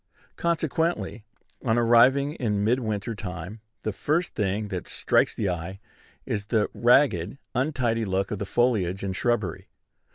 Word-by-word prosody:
Consequently, 160 - -1 0.4
on 115 -2 +2
arriving 125 +5 +5
in 105 -9 -1
mid 120 +5 +2
winter 110 -1 -3
time, 95 0 -7 0.2
the 110 - -2
first 155 - 0
thing 105 +1 -1
that 90 -3 -4
strikes - - +1
the 105 - -1
eye 90 +2 -4 0.5
is 105 -1 -3
the 110 -2 +1
ragged, 120 - +3 0.2
untidy 125 -4 0
look 95 -1 -1
of 105 - -3
the 100 - -4
foliage 100 -6 +1
and 95 -1 -2
shrubbery. 105 -6 -1
110 Hz, 140 wpm, -26 LUFS, 95-125 Hz, 0.5 s, arriving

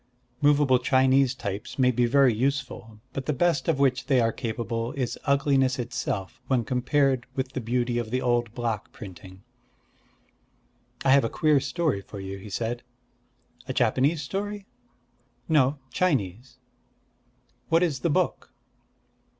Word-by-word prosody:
Movable 145 -3 +4
Chinese 130 +1 +3
types 100 -3 -5
may 130 -2 +4
be 120 0 +2
very 135 0 +4
useful; 125 -3 -3
but 135 -1 -5
the 150 - +1
best 165 -5 +1
of 165 -4 +2
which 130 -2 +1
they 135 -3 +4
are 115 -1 +2
capable 115 0 -3
is 130 -4 -2
ugliness 140 -2 +2
itself 125 -5 -4
when 130 -3 +1
compared 130 +1 +1
with 130 -1 -2
the 130 - -3
beauty 120 +1 0
of 115 -2 -4
the 130 +3 0
old 120 -2 0
block 115 -4 -3
printing. 95 -2 -11 1.6
"I 135 - +5
have 140 0 +6
a 115 - 0
queer 155 -2 +3
story 145 - -1
for 100 +1 -10
you," 95 0 -6
he 105 - -10
said. 115 +4 -3 0.9
"A - - -3
Japanese 145 +4 +2
story?" 205 +5 -4 0.8
"No, 145 -3 +3
Chinese." 125 - -1 1.1
"What 165 +2 +4
is 150 -7 0
the 170 - 0
book?" 145 - -1
130 Hz, 140 wpm, -26 LUFS, 115-140 Hz, 1.6 s, have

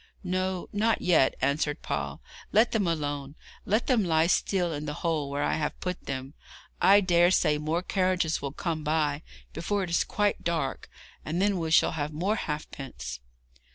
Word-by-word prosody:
'No, 185 0 -2
not 220 +2 +2
yet,' 160 -7 +4
answered 145 +1 0
Paul; 70 -1 -3 0.3
'let 220 +3 +4
them 210 -5 +1
alone 145 -3 -2 0.3
let 215 +4 +2
them 240 -5 +3
lie 160 -2 +3
still 175 -1 +1
in 150 0 -5
the 150 - -3
hole 155 -4 0
where 140 +1 -2
I - - +1
have 150 - -3
put 180 0 -5
them. 135 +1 -4 0.5
I 200 +1 +7
dare 175 -2 +4
say 150 -5 +2
more 160 +4 -1
carriages 185 -4 0
will 140 - -3
come 160 0 -3
by 150 -1 0 0.3
before 195 +5 -1
it 175 - -4
is 170 - +3
quite 205 -1 0
dark, 160 -6 -2 0.3
and 165 +3 -2
then 200 -1 +2
we 165 -1 -2
shall 160 - +5
have 150 -1 -3
more 185 +8 0
halfpence.' 135 - -5
165 Hz, 175 wpm, -28 LUFS, 150-185 Hz, 0.5 s, I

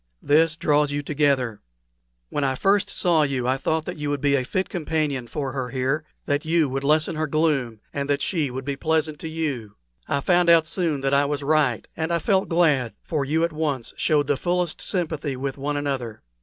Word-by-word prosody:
This 155 +2 +3
draws 150 -2 +2
you 145 0 -2
together. 140 -7 +1 0.7
When 145 - -1
I 135 -1 +1
first 200 +7 +2
saw 170 -4 +2
you 135 -4 0
I 130 +1 +2
thought 160 +3 -1
that 180 -1 -5
you 150 -1 -3
would 145 -1 -1
be 140 0 +2
a 130 - +1
fit 185 +9 -1
companion 150 -6 -2
for 135 +3 -3
her 130 -2 -3
here 135 +4 -1 0.2
that 145 +1 0
you 160 -1 +2
would 135 +1 -3
lessen 155 +3 +2
her 155 0 -1
gloom, 140 -8 0
and 140 0 -3
that 145 0 +1
she 160 -7 0
would 130 +1 -6
be 140 -1 -2
pleasant 155 0 0
to - - -5
you. 140 -10 -3 0.3
I 140 -2 0
found 175 +2 +3
out 165 -1 +6
soon 160 -4 -1
that 135 0 0
I 140 +1 +4
was 145 0 -2
right, 145 -6 +1
and 160 +1 -2
I 170 - +3
felt 190 +2 +1
glad, 150 -9 +2
for 155 -4 -1
you 155 +4 +1
at 170 -1 0
once 145 -6 -2
showed 150 -2 +2
the 145 0 +1
fullest 175 +1 -1
sympathy 160 -6 -2
with 135 +1 -3
one 145 +1 -2
another. 130 -6 -3
145 Hz, 210 wpm, -24 LUFS, 135-160 Hz, 0.7 s, out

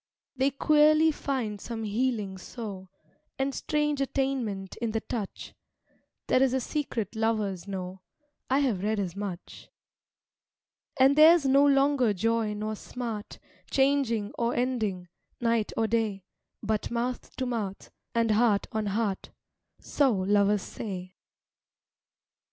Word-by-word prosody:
They 265 +1 +2
queerly 305 +3 +4
find 250 -9 -3
some 230 -2 -5
healing 210 -3 -1
so, 195 -3 -7 0.5
And 270 +1 -1
strange 295 -1 0
attainment 255 -8 -2
in 230 -2 -2
the 225 - +1
touch; 215 -5 -5 0.7
There 255 - +3
is 265 -1 +3
a - - +2
secret 245 -6 -3
lovers 210 -5 -1
know, 185 -1 -5 0.5
I 270 +2 +3
have 235 -10 0
read 215 +1 0
as 185 -3 -3
much. 200 -3 -7 1.3
And 270 +2 +6
theirs 315 0 +7
no 275 +1 +5
longer 275 -4 +3
joy 225 +1 0
nor 215 +1 -3
smart, 225 -2 -6 0.3
Changing 265 -6 +1
or 235 0 0
ending, 220 -8 -1 0.3
night 230 -2 +1
or 225 - +2
day; 220 -3 0 0.4
But 215 0 -1
mouth 240 +1 -3
to 260 - -2
mouth, 215 -6 -4 0.2
and 230 -1 +2
heart 215 -2 +3
on 215 -1 -2
heart, 200 -1 -1 0.5
So 280 -3 +2
lovers 200 +1 +2
say. 185 -4 -6
225 Hz, 125 wpm, -28 LUFS, 205-265 Hz, 1.3 s, theirs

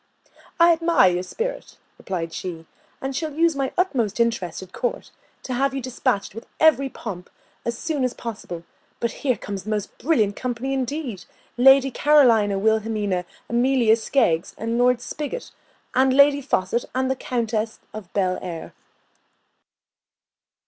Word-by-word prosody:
"I 340 0 +7
admire 330 - +4
your 175 0 -1
spirit," 460 - -5 0.2
replied 170 -3 -4
she, 165 -3 -6 0.4
"and 270 0 -3
shall 305 0 -3
use 330 0 +3
my 270 -1 -1
utmost 245 - 0
interest 210 -7 0
at 185 - -14
court 245 - -3 0.3
to 255 - -4
have 270 +2 +1
you - - -1
despatched 250 -5 -1
with 225 +3 -9
every 275 -4 +4
pomp, 185 -8 -7 0.4
and - - -8
as 235 0 -1
soon 305 -3 -2
as 250 -1 -1
possible; 200 -7 -7 0.4
but 235 - -1
here 255 -5 +1
comes 200 0 -6
a - - -3
most 210 -2 -3
brilliant 220 -10 +2
company 255 +2 -3
indeed, 265 - -3 0.3
Lady 270 +2 +6
Carolina 235 -9 +4
Wilhelmina 210 -3 0 0.2
Amelia 240 -2 +3
Skeggs, 220 -8 +1
Lord 240 +2 +2
Spigot, 300 - -5 0.4
and 260 +1 +4
Lady 285 0 +6
Faucet, 235 -3 0
and 260 0 +1
the - - 0
Countess 225 -3 -2
of 210 -4 -9
Belleair." 185 -3 -2
235 Hz, 140 wpm, -23 LUFS, 205-270 Hz, 0.4 s, I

